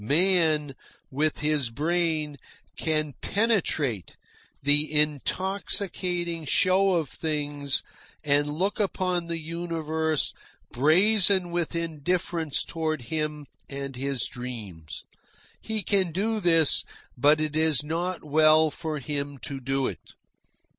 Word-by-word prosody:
Man, 155 Hz, -, +2 dB, 0.4 s
with 150 Hz, +3 st, 0 dB
his 150 Hz, -4 st, +1 dB
brain, 155 Hz, +1 st, -1 dB, 0.4 s
can 155 Hz, -2 st, -1 dB
penetrate 170 Hz, -, 0 dB, 0.5 s
the 145 Hz, +2 st, +4 dB
intoxicating 175 Hz, +2 st, -1 dB
show 190 Hz, +5 st, +3 dB
of 160 Hz, -4 st, 0 dB
things 145 Hz, -2 st, -2 dB, 0.4 s
and 145 Hz, 0 st, +2 dB
look 185 Hz, +9 st, -1 dB
upon 185 Hz, -4 st, -1 dB
the 170 Hz, 0 st, -3 dB
universe 160 Hz, -1 st, -1 dB, 0.4 s
brazen 185 Hz, -, +4 dB
with 170 Hz, -1 st, -2 dB
indifference 165 Hz, -1 st, -1 dB
toward 155 Hz, -4 st, -3 dB
him 150 Hz, -1 st, -2 dB, 0.2 s
and 140 Hz, -1 st, -6 dB
his 135 Hz, -1 st, -2 dB
dreams. 105 Hz, -, -7 dB, 0.6 s
He 220 Hz, -2 st, -3 dB
can 190 Hz, -2 st, +1 dB
do 215 Hz, +6 st, -1 dB
this, 165 Hz, -5 st, +4 dB, 0.3 s
but 145 Hz, +5 st, +4 dB
it 155 Hz, -1 st, -2 dB
is 155 Hz, -2 st, +3 dB
not 170 Hz, +4 st, -3 dB
well 155 Hz, +1 st, +4 dB
for 160 Hz, 0 st, -4 dB
him 140 Hz, +1 st, -4 dB
to 140 Hz, -1 st, -5 dB
do 135 Hz, +1 st, 0 dB
it. -, -, -6 dB
155 Hz, 110 wpm, -26 LUFS, 145-175 Hz, 0.6 s, the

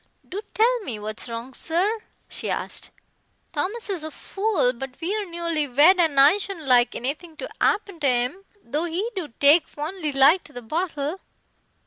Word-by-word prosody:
"Do 390 Hz, +3 st, -5 dB
tell 480 Hz, +3 st, +3 dB
me 255 Hz, -, -5 dB
what's 215 Hz, +3 st, -5 dB
wrong, 230 Hz, +3 st, -6 dB
sir?" 375 Hz, -, 0 dB, 0.3 s
she -, -, -5 dB
asked. -, -, -3 dB, 0.6 s
"Thomas 400 Hz, +10 st, -2 dB
is 375 Hz, -6 st, -3 dB
a 315 Hz, -, -4 dB
fool, 390 Hz, -, 0 dB
but 260 Hz, +1 st, -8 dB
we're 395 Hz, +3 st, -2 dB
newly 335 Hz, -3 st, -1 dB
wed 300 Hz, +9 st, +5 dB
and 315 Hz, -5 st, +3 dB
I 290 Hz, +9 st, +7 dB
shouldn't 390 Hz, -6 st, -5 dB
like 250 Hz, -2 st, +4 dB
anything 305 Hz, +6 st, -4 dB
to 270 Hz, -, -5 dB, 0.2 s
'appen 400 Hz, -4 st, +1 dB
to 290 Hz, -, +1 dB
'im, 250 Hz, +9 st, 0 dB, 0.2 s
though 295 Hz, +8 st, -1 dB
he 365 Hz, +8 st, -2 dB
do 365 Hz, -5 st, -3 dB
take 295 Hz, +4 st, +6 dB
fondly 310 Hz, +1 st, -4 dB
like 280 Hz, +6 st, +5 dB
to 295 Hz, -, -15 dB
the 245 Hz, -1 st, -8 dB
bottle." 310 Hz, +4 st, -2 dB
315 Hz, 170 wpm, -24 LUFS, 275-380 Hz, 0.6 s, I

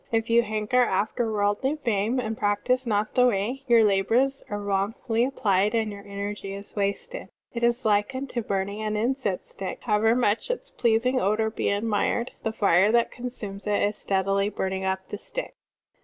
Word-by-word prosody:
If 225 Hz, 0 st, 0 dB
you 235 Hz, +1 st, +6 dB
hanker 215 Hz, +3 st, +1 dB
after 220 Hz, +1 st, 0 dB
worldly 210 Hz, +7 st, +1 dB
fame 235 Hz, -3 st, 0 dB
and 225 Hz, -2 st, -2 dB
practise 235 Hz, +5 st, 0 dB
not 210 Hz, -1 st, 0 dB
the 250 Hz, 0 st, +5 dB
Way, 235 Hz, +4 st, -1 dB
your 235 Hz, -2 st, +6 dB
labors 225 Hz, +7 st, +2 dB
are 205 Hz, -, -3 dB
wrongfully 205 Hz, +4 st, 0 dB
applied 210 Hz, -5 st, +1 dB
and 220 Hz, -2 st, 0 dB
your 200 Hz, 0 st, -9 dB
energy 200 Hz, 0 st, -5 dB
is 200 Hz, 0 st, -11 dB
wasted. 200 Hz, -, -3 dB, 0.2 s
It 235 Hz, -, -4 dB
is 240 Hz, +1 st, +2 dB
like 210 Hz, +4 st, +2 dB
unto 260 Hz, -2 st, -3 dB
burning 200 Hz, 0 st, -2 dB
an 215 Hz, -1 st, -1 dB
incense 235 Hz, -4 st, -1 dB
stick. 195 Hz, -, -6 dB
How 210 Hz, -3 st, +2 dB
ever 225 Hz, +2 st, +3 dB
much 235 Hz, -, +1 dB
its -, -, -3 dB
pleasing 245 Hz, +2 st, +2 dB
odor 215 Hz, +3 st, +1 dB
be -, -, -1 dB
admired, 215 Hz, +3 st, 0 dB
the 220 Hz, -, -1 dB
fire 200 Hz, -1 st, +3 dB
that 235 Hz, 0 st, +3 dB
consumes 215 Hz, -5 st, -6 dB
is 205 Hz, 0 st, +1 dB
steadily 195 Hz, 0 st, 0 dB
burning 190 Hz, -2 st, -3 dB
up 190 Hz, 0 st, -2 dB
the 205 Hz, -, -5 dB
stick." -, -, -5 dB
215 Hz, 175 wpm, -26 LUFS, 200-240 Hz, 0.2 s, you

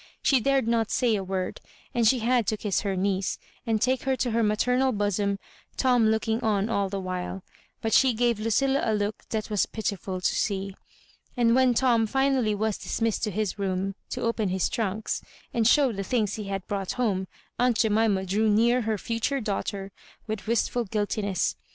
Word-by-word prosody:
She 270 Hz, -, +4 dB
dared 270 Hz, 0 st, +1 dB
not 230 Hz, -2 st, +1 dB
say 245 Hz, -3 st, +2 dB
a 195 Hz, -, -2 dB
word, 185 Hz, -1 st, -3 dB, 0.3 s
and 235 Hz, -2 st, +3 dB
she 255 Hz, -, +5 dB
had 240 Hz, -2 st, +2 dB
to 215 Hz, -, 0 dB
kiss 205 Hz, -2 st, -1 dB
her 200 Hz, -3 st, -1 dB
niece, 190 Hz, 0 st, 0 dB, 0.3 s
and 220 Hz, -1 st, +2 dB
take 255 Hz, +2 st, +1 dB
her 265 Hz, 0 st, 0 dB
to 250 Hz, -2 st, -1 dB
her 230 Hz, +1 st, +1 dB
maternal 250 Hz, +5 st, +2 dB
bosom, 205 Hz, -2 st, 0 dB, 0.4 s
Tom 245 Hz, -4 st, +3 dB
looking 220 Hz, +1 st, +1 dB
on 210 Hz, -1 st, +1 dB
all 200 Hz, -3 st, 0 dB
the 195 Hz, 0 st, -3 dB
while; 185 Hz, 0 st, -4 dB, 0.4 s
but 225 Hz, -, 0 dB
she 260 Hz, -3 st, +5 dB
gave 235 Hz, -1 st, +1 dB
Ludlla 265 Hz, +6 st, +1 dB
a 220 Hz, -, +1 dB
look 205 Hz, 0 st, -2 dB
&at 215 Hz, -1 st, -3 dB
was 210 Hz, -, +2 dB
pitiful 200 Hz, -4 st, -3 dB
to 180 Hz, -, 0 dB
see. 195 Hz, -1 st, -1 dB, 0.6 s
And 230 Hz, -1 st, +4 dB
when 255 Hz, -1 st, +4 dB
Tom 235 Hz, -3 st, +3 dB
finally 265 Hz, -3 st, +1 dB
was 215 Hz, 0 st, -1 dB
dis -, -, -4 dB
missed 225 Hz, -1 st, 0 dB
to -, -, -2 dB
his 210 Hz, 0 st, -2 dB
room, 195 Hz, 0 st, -1 dB, 0.2 s
to -, -, -4 dB
open 230 Hz, -3 st, 0 dB
his 185 Hz, 0 st, 0 dB
trunks, 215 Hz, -1 st, -2 dB, 0.3 s
and 225 Hz, -2 st, +2 dB
show 275 Hz, 0 st, +5 dB
the 200 Hz, -3 st, -4 dB
things 215 Hz, -2 st, 0 dB
he 215 Hz, -, -5 dB
had 195 Hz, -1 st, -4 dB
brought 195 Hz, -2 st, -3 dB
home, 200 Hz, -7 st, 0 dB, 0.3 s
aunt 245 Hz, -2 st, +3 dB
Jemima 215 Hz, -3 st, +2 dB
drew 210 Hz, +4 st, +1 dB
near 235 Hz, +4 st, +3 dB
her 220 Hz, -1 st, -1 dB
future 230 Hz, +7 st, -1 dB
daughter 200 Hz, -3 st, -3 dB, 0.3 s
with 215 Hz, -2 st, -5 dB
wistful 235 Hz, +1 st, +1 dB
guiltiness. 205 Hz, -2 st, -1 dB
220 Hz, 190 wpm, -26 LUFS, 200-235 Hz, 0.6 s, she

